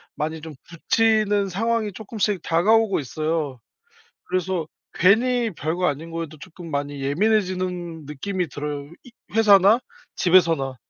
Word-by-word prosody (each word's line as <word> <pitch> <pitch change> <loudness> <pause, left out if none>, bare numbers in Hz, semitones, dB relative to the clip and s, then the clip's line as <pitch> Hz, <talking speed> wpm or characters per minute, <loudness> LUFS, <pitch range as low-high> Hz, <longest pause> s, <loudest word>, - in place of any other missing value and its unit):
많이 160 +1 -3
좀 160 0 -8 0.2
부치는 210 +3 +1
상황이 220 +3 -1
쪼끔씩 210 -1 -2
다가오고 205 +6 +3
있어요. 155 -1 -3 0.7
그래서 180 -2 -2 0.3
괜히 235 +5 +3
별거 170 +2 -2
아닌 160 +3 -3
것에도 165 -2 -5
조금 170 +1 -11
많이 145 -1 -3
예민해지는 180 0 -1
느낌이 180 +6 -3
들어요, 145 0 -5
이 250 - -15 0.2
회사나 210 0 +6 0.4
집에서나. 165 -7 +3
180 Hz, 295 characters per minute, -23 LUFS, 155-205 Hz, 0.7 s, 회사나